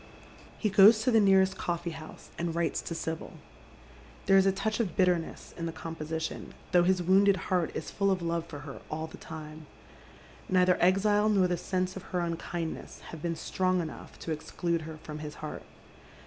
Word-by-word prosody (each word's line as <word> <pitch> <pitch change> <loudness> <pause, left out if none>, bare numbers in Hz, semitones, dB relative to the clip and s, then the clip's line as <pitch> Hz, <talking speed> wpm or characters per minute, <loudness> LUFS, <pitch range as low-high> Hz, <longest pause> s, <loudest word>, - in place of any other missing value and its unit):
He 215 - 0
goes 210 +3 +7
to 255 - +3
tiie 225 -2 +5
nearest 190 -1 +4
coffee 170 0 -2
house 160 -1 -11
and 170 -1 -3
writes 170 -1 0
to 165 - -5
Sibyl. 160 0 -4 0.9
There 195 - +5
is 195 0 +6
a - - +5
touch 205 +4 -2
of 200 -8 -1
bitterness 180 -3 0
in 165 -1 -4
the - - -3
composition, 160 0 -5 0.2
though 180 -2 +6
his 180 0 +2
wounded 195 +2 +5 0.2
heart 175 -3 +2
Is - - -4
full 200 -1 +1
of 190 -1 +2
love 170 0 -1
for 145 -3 -8
her 140 -2 -9
all 160 +1 -3
the 160 - -11
time. 155 -1 -9 0.8
Neither 180 -1 +4
exile 205 +3 +4
nor 195 -3 +4
the 180 - 0
sense 185 +1 -2
of 190 - -6 0.2
her - - +1
unkindness 170 -1 -4
have 160 - -8
been 170 0 -1
strong 185 +3 0
enough 160 -3 -7
to 165 - -4
exclude 170 +2 -2
her 160 - -8
from 150 0 -7
his 150 -1 -7
heart. 155 - -6
175 Hz, 190 wpm, -29 LUFS, 160-190 Hz, 0.9 s, goes